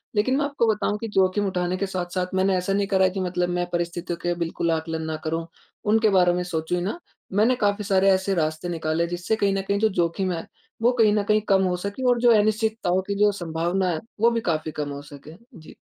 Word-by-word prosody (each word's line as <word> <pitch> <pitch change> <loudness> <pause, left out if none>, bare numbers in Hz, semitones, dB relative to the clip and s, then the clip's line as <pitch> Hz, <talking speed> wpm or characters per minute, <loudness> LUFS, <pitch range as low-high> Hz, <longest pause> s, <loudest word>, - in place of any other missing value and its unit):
लेकिन 255 +6 +2
मैं 290 - +1
आपको 280 -5 0
बताऊँ 210 0 -1
कि 225 - -4
जोखिम 190 +2 +2
उठाने 180 0 -1
के 200 - -1
साथ-साथ 180 0 -3
मैंने 190 0 +2
ऐसा 180 +2 -1
नहीं 200 0 +1
करा 190 -1 +2
है - - +3
कि 190 - -4
मतलब 180 -1 -1
मैं 175 0 -1
परिस्थितियों 175 0 -3
के 175 0 -1
बिल्कुल 170 0 -1
आकलन 160 0 -2
ना 160 0 -3
करूँ, 165 +1 -2 0.4
उनके 220 +1 +3
बारे 180 -2 +4
में 180 0 -1
सोचूँ 175 0 -2
ही 175 - -2
ना। 210 - -3 0.3
मैंने 225 +5 +3
काफ़ी 205 -2 0
सारे 195 -1 +3
ऐसे 190 +1 +1
रास्ते 160 +1 -1
निकाले 165 0 -1
जिससे 175 +5 -1
कहीं 200 -2 +1
न 195 - 0
कहीं 200 0 +1
जो 220 - +3
जोखिम 185 0 0
है 165 - -5 0.4
वो 240 +2 +4
कहीं 220 -4 +4
न 210 -1 +1
कहीं 215 +1 +2
कम 190 -1 +4
हो 180 -1 +1
सके 200 +7 -5
और 240 -1 +3
जो 240 -1 +6
अनिश्चितताओं 215 -3 +1
की 200 - -1
जो 210 0 +5
संभावना 175 +1 -1
है 160 -3 -1 0.2
वो 235 +1 +5
भी 230 -1 -1
काफ़ी 155 -3 -1
कम 150 -1 -4
हो 140 0 -6
सके। 145 +2 -12 0.2
जी। 155 - -14
185 Hz, 240 wpm, -24 LUFS, 170-205 Hz, 0.4 s, जो